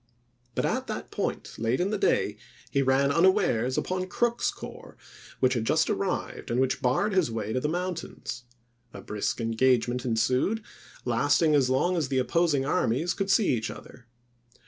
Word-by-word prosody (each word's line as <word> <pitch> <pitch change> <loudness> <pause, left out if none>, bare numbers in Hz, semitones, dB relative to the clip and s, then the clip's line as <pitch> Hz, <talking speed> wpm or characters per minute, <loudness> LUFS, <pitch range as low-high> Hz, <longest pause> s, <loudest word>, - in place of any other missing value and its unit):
But - - 0
at - - -1
that - - -5
point, - - -4
late 115 +3 0
in 185 +3 0
the 215 - 0
day, 105 - +1 0.3
he 140 - +2
ran 135 +1 +3
unawares 135 -7 +3
upon 185 0 -1
Crook's 235 +5 0
corps, - - -9 0.4
which 130 0 +3
had 120 -3 -1
just - - +2
arrived, - - -3
and 120 - 0
which 130 +1 +1
barred 135 +12 +1
his 185 -8 +2
way 110 -1 -3
to 130 - +1
the 150 - -1
mountains. 170 -8 -4 0.5
A - - -7
brisk 105 +3 -3
engagement 120 +1 +1
en 120 -3 0
sued, 130 - +1 0.4
lasting 145 +6 +3
as 135 -3 +3
long 175 +8 +2
as 155 -5 0
the 135 0 -1
opposing 145 +1 +2
armies 145 +4 +1
could 195 -1 -3
see 205 +1 +4
each 115 -3 0
other. 120 -1 -11
130 Hz, 170 wpm, -27 LUFS, 120-175 Hz, 0.5 s, see